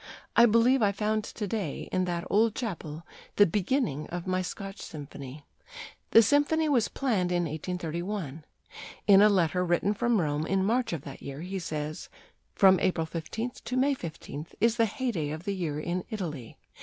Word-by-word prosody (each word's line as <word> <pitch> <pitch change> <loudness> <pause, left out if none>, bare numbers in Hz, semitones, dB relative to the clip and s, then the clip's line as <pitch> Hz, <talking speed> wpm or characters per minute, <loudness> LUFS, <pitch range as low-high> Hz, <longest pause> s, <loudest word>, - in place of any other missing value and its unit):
I 235 0 +8
believe 235 +4 +4
I 205 -2 +4
found 215 +2 -1
to 210 - -5
day 195 -7 -3
in 185 0 +1
that 175 -1 -2
old 220 +1 +3
chapel 170 -8 -5 0.3
the 205 - +7
beginning 195 - 0
of 175 0 -5
my 185 0 0
Scotch 195 +2 -6
symphony." 145 -1 -9 0.6
The 225 - +7
symphony 290 +6 +3
was 255 -7 +3
planned 210 -10 0
in 175 0 +1
1831. 170 0 -4 0.6
In 200 -1 +7
a 210 - +7
letter 180 -2 +2
written 180 +3 +1
from 240 0 +1
Rome 150 -1 -1
in 190 0 +1
March 240 +4 +1
of 160 -5 -4
that 140 - -9
year 140 +2 -7
he 190 +2 -4
says: 155 -2 -5 0.5
"From 190 -3 +6
April 175 -3 +1
15th 180 +9 -5
to 250 - -3
May 275 +2 +3
15th 160 - -7
is 230 +2 +3
the 230 - +4
heyday 205 - -2
of 155 +2 -5
the 200 - -2
year 165 -6 -3
in 175 +3 -2
Italy. 155 - -5
185 Hz, 175 wpm, -28 LUFS, 160-220 Hz, 0.6 s, I